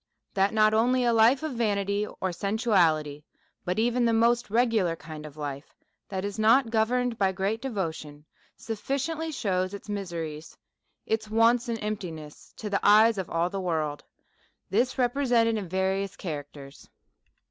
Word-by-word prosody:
IThat 195 0 +2
7iot 215 0 +4
only 250 +3 +3
a 240 -1 +3
Life 230 +6 +4
of 315 - -2
vanity 205 -3 0
or 190 -2 -4
sensuality, 175 -8 +1 0.4
but 180 +1 -2
even 240 +2 +1
the 230 -1 +3
most 235 +1 +2
regular 220 -6 +2
kind 155 -2 -9
of 150 0 -14
Life 145 -1 -6 0.3
that 190 0 -3
is 205 +1 -5
not 230 +2 +4
governed 235 +1 +1
by 195 -1 +3
great 195 +4 -2
Devotion, 160 - -5 0.3
sufficiently 280 +8 -3
shews 185 -7 -1
its 200 - -11
miseries, 170 -6 -5 0.5
its 220 -1 -2
wants, 230 +2 +3
and 230 - -1
emptiness, 170 -8 -6
to 215 - -6
the 200 -1 0
eyes 215 +1 +5
of 185 - -4
all 170 +2 0
the 195 - -3
world; 155 -5 -2 0.7
this 245 +6 +1
represented 245 -3 +2
in 200 -5 -4
various 190 +1 -1
Characters. 145 -5 -8
205 Hz, 150 wpm, -27 LUFS, 175-230 Hz, 0.7 s, eyes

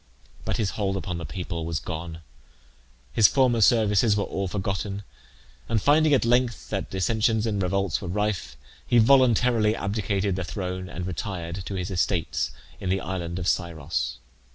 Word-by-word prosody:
But - - -1
his 105 -3 0
hold 100 -2 -1
upon 90 -3 -4
the 85 - -6
people 85 +3 -4
was 80 0 -2
gone. 85 -1 -6 0.9
His 110 -3 +7
former 125 -4 +3
services 105 -1 +4
were 100 - +1
all 95 0 -3
forgotten, 100 +1 -3 0.7
and, 115 -1 +2
finding 150 +6 +4
at 125 - +1
length 120 0 +1
that - - -2
dissensions 110 +3 +1
and 105 -3 -1
revolts 95 -1 0
were 95 - -5
rife, 105 +2 -2 0.3
he 120 - +3
voluntarily 120 -3 +4
abdicated 100 -2 -1
the 95 - -2
throne, 90 -1 -4
and 90 +1 -5
retired 90 -1 -4
to 100 - -4
his 90 +1 -3
estates 85 -7 0 0.3
in 95 - -3
the 95 +1 +1
island 85 -2 -4
of 90 -1 -3
Scyros. 75 -9 -1
95 Hz, 160 wpm, -25 LUFS, 90-110 Hz, 0.9 s, His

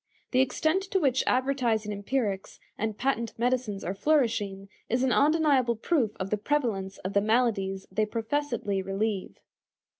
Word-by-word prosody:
The 255 - +3
extent 315 +7 +1
to 385 - +2
which 265 -6 +2
advertising 250 -5 +1
empirics 205 -1 -2 0.2
and 220 -1 -3
patent 235 -4 -1
medicines 240 -4 0
are 185 - -2
flourishing 210 -6 +1 0.2
is 245 +3 +1
an 260 - +2
undeniable 285 -5 +3
proof 235 - 0
of 190 +1 -4
the 210 - +2
prevalence 210 -7 -1
of 190 +2 -5
the 200 - +4
maladies 205 -4 +1
they 215 +2 +1
professedly 230 -3 -1
relieve. 195 +1 -2
230 Hz, 145 wpm, -28 LUFS, 200-265 Hz, 0.2 s, the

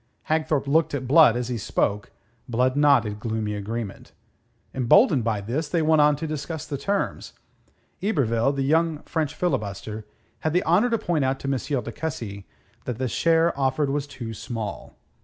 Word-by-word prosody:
Hagthorpe 155 -2 +1
looked 155 +1 +2
at 130 -2 -4
Blood 140 -4 +6
as 125 0 -3
he 120 -2 -2
spoke. 105 -1 -1 0.4
Blood 125 +2 +1
nodded 130 -8 +3
gloomy 110 -1 -2
agreement. 105 +1 -5 0.6
Emboldened 135 - +4
by 110 -2 -1
this, 135 +9 -3
they 165 -1 +1
went 155 -1 +4
on 150 0 +5
to 155 +3 -5
discuss 155 0 -4
the 140 +2 -4
terms. 200 +8 -2 0.7
Yberville, 135 - +1
the 140 -1 -2
young 160 +2 +1
French 155 -3 -2
filibuster, 105 - -3 0.4
had 155 - -1
the 180 - +2
honour 185 +9 +3
to 230 - +1
point 170 -8 0
out 130 0 0
to - - -5
M. 135 0 -1
de 115 - -6
Cussy 110 -9 -5 0.4
that 125 -3 -3
the 130 +1 -1
share 165 +5 +2
offered 135 +1 0
was 145 0 -2
too 115 -5 -7
small. 110 -1 -6
140 Hz, 170 wpm, -24 LUFS, 115-155 Hz, 0.7 s, Blood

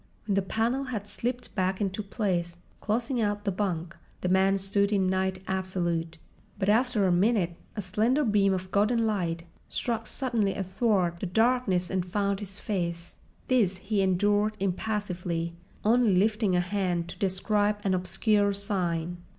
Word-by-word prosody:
When 205 - 0
the 195 - +3
panel 230 +7 0
had 220 -5 -4
slipped 245 +3 -3
back 190 -1 0
into 200 0 -1
place, 185 -5 -2 0.2
closing 235 +3 -1
out 205 -1 -1
the 200 - +1
bunk, 180 -4 -2 0.3
the 180 - 0
man 190 +1 +4
stood 200 +1 +1
in 195 -2 +2
night 190 0 0
absolute. 175 -3 -2 0.4
But 195 -1 0
after 225 -1 +3
a 185 - +3
minute 180 -1 +2 0.2
a 210 - -3
slender 225 +10 +1
beam 205 -3 +3
of 185 0 -3
golden 225 +3 +2
light 175 -6 -1 0.3
struck 230 -2 -2
suddenly 235 -7 0
athwart 190 -3 0
the 190 - -3
darkness 220 -3 +2
and 190 -1 0
found 200 +2 -1
his 200 -1 -7
face. 170 -5 -3 0.3
This 210 -8 +2
he 195 +1 -1
endured 205 +3 +2
impassively, 180 -4 -2 0.3
only 225 -2 +4
lifting 210 0 +2
a 180 - +3
hand 180 -2 -1
to - - -9
describe 205 +1 +1
an 195 -3 +1
obscure 200 +3 +2
sign. 175 -4 -1
195 Hz, 155 wpm, -28 LUFS, 185-215 Hz, 0.4 s, man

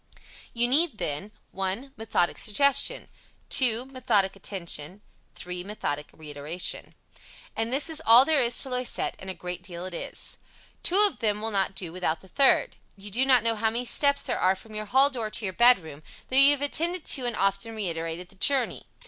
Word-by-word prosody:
You 240 0 +1
need, 290 0 +4
then: 150 +7 -4 0.2
1. 195 +8 -4
Methodic 220 -6 -1
suggestion. 280 +5 +2 0.4
2. 245 -2 +4
Methodic 235 -8 0
attention. 185 -1 -4 0.3
3. 180 0 -6
Methodic 150 -7 -4
reiteration. 150 +3 -4 0.6
And 225 +1 -2
this 275 +3 +1
is 320 -2 -2
all 235 +3 +8
there 310 -1 +2
is 240 -2 +2
to 270 - -6
Loisette, 250 -1 -2
and 190 - -9
a 190 - -5
great 180 0 -6
deal 175 -1 -8
it 185 - -8
is. - - -7 0.4
Two 380 +4 +3
of 415 -2 +2
them 210 -3 0
will 225 +1 -2
not 195 -1 0
do 175 -4 -5
without 165 -3 -2
the 190 - -15
third. 280 - +2 0.2
You 200 +1 -9
do 255 +6 +1
not 255 -4 +5
know 230 0 +1
how 220 +1 0
many 235 +3 -3
steps 280 +3 +3
there - - -3
are 185 +1 +2
from 215 +3 -13
your 215 0 -5
hall 265 +6 +3
door 230 -5 -4
to 215 - -4
your 190 - -3
bedroom, 180 - +3 0.3
though - - -1
you 275 +1 +8
have 290 -1 +2
attended 335 +4 -1
to 255 -3 -1
and 240 - -3
often 200 +3 -1
reiterated 170 -3 -4
the - - -19
journey. 265 +4 +1
220 Hz, 190 wpm, -26 LUFS, 185-260 Hz, 0.6 s, all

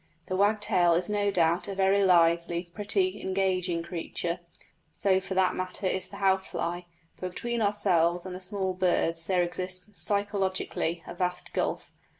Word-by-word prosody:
The 185 - -3
wagtail 200 -3 +3
is 180 +4 -1
no 205 -1 +1
doubt 170 0 +2
a 200 - -4
very 195 +1 +3
lively, 170 -1 +3
pretty, 200 -1 +1
engaging 185 -3 0
creature 170 0 -4 0.5
so 190 -2 +2
for 190 0 -5
that 190 -1 +3
matter 185 +1 -4
is 185 0 0
the 200 - -9
house 190 -1 +2
fly 175 +1 -4 0.3
but 185 - -4
between 235 +4 -2
ourselves 180 -4 +2
and 185 - -6
the 185 - -7
small 190 0 -2
birds 170 -3 0
there 180 -2 +2
exists, 185 +2 -4
psychologically, 195 -5 -1
a - - -7
vast 180 0 -3
gulf. - - -2
185 Hz, 155 wpm, -28 LUFS, 175-195 Hz, 0.5 s, wagtail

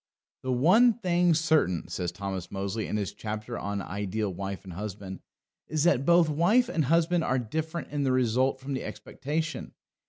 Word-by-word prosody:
"The 130 - -2
one 185 - +5
thing 175 -5 +2
certain," 155 - +2
says 90 -2 -3
Thomas 95 -3 -5
Mozley 100 +3 -3
in - - -1
his 100 -3 -3
chapter 110 +2 -5
on 100 -2 -3
Ideal 100 0 -3
Wife 95 +1 -5
and 95 -3 -9
Husband, 95 0 -6 0.5
"is 155 -1 0
that 140 -6 +3
both 170 -1 +6
wife 190 +12 +3
and 160 - 0
husband 165 +3 +2
are 130 - +1
different 160 +8 -4
in 145 -1 -1
the 135 -2 +1
result 130 +1 +2
from 135 +1 -5
the 130 - -3
expectation. 155 +3 -4
130 Hz, 175 wpm, -28 LUFS, 100-160 Hz, 0.5 s, both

